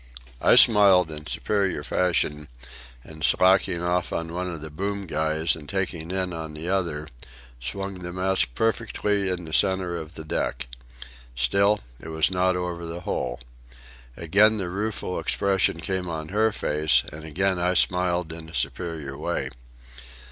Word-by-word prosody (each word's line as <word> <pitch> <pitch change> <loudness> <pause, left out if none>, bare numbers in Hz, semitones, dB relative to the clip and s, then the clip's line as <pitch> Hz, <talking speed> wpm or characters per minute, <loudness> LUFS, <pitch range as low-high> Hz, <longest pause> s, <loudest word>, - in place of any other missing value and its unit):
I - - +6
smiled 95 -6 +6
in 75 0 -8
superior 100 +1 -1
fashion, 75 -4 0 0.6
and, 80 -1 -9
slacking 90 +2 +4
off 90 0 0
on 85 0 -3
one 90 +1 -3
of 85 - -6
the 80 0 -8
boom 100 +5 -3
guys 80 0 0
and 75 -3 -11
taking 90 -3 -2
in 95 -1 -1
on 80 -2 -6
the 80 +3 -6
other, 85 -6 -1 0.5
swung 95 +10 -4
the 90 0 -5
mast 90 -8 +1
perfectly 105 -3 0
in 90 -2 -3
the 80 - -8
centre 95 -2 +2
of 80 0 -8
the 80 - -7
deck. 80 - -2 0.7
Still 100 +13 +2 0.2
it - - -10
was 80 +2 +1
not 90 0 +2
over 90 -1 -3
the 85 +1 -6
hole. 60 -8 -3 0.8
Again 105 +6 +4
the 95 -4 -3
rueful 100 -2 -3
expression 95 -4 +1
came 90 +1 -3
on 80 -1 -5
her 110 +3 +2
face, 75 -8 +2
and 75 +1 -9
again 90 +4 0
I 90 +1 +1
smiled 90 -2 +1
in 80 -1 -9
a 80 - -9
superior 80 -6 -3
way. - - -3
90 Hz, 155 wpm, -25 LUFS, 80-95 Hz, 0.8 s, I